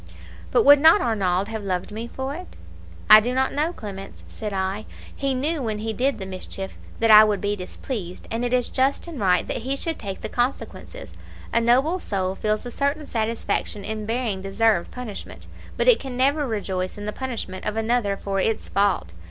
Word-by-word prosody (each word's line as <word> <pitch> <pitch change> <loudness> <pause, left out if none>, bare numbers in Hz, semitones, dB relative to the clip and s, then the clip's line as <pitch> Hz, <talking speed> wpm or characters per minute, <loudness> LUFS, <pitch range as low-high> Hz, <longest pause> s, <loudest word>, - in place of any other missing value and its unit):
"'But - - +3
would 285 0 +9
not 320 +7 +7
Arnauld 200 - 0
have 220 -2 -5
loved 185 0 -2
me 225 +3 -5
for 265 +3 -4
it?' 360 +4 -9 0.6
"'I 215 - +12
do 240 +4 -2
not 265 0 +1
know, 305 +4 0
Clemence,' 195 - -9
said 215 -2 -6
I, 195 +2 -2 0.3
'He 275 -1 -1
knew, 295 +4 -1
when 220 -4 -2
he 220 +1 -3
did 260 +3 0
the 195 - -6
mischief, 190 +1 -6 0.3
that 225 -1 +4
I 215 0 +11
would 210 -2 +1
be 205 +2 -1
displeased, 185 0 -6
and 230 +2 -1
it 245 - -1
is 250 -1 +2
just 270 +1 0
and 335 -6 -7
right 180 -3 +2
that - - -2
he 265 +4 -2
should 325 +3 -4
take 195 -3 -6
the - - -4
consequences. 270 - -3 0.4
A 235 - +3
noble 265 +10 +3
soul 190 - -2
feels 215 +3 -1
a 245 - -5
certain 285 +4 -1
satisfaction 220 -3 -2
in 215 -1 -4
bearing 225 -4 -1
deserved 195 -1 +1
punishment, 245 -5 -8 0.3
but - - 0
it - - +7
can 260 -2 -6
never 280 +3 +2
rejoice 190 -5 -3
in 205 - -6
the 210 - -3
punishment 230 -8 -5
of 215 +1 -2
another 225 -3 +1
for 195 0 -2
its 220 +3 -1
fault. 195 - +1
225 Hz, 200 wpm, -24 LUFS, 200-260 Hz, 0.6 s, I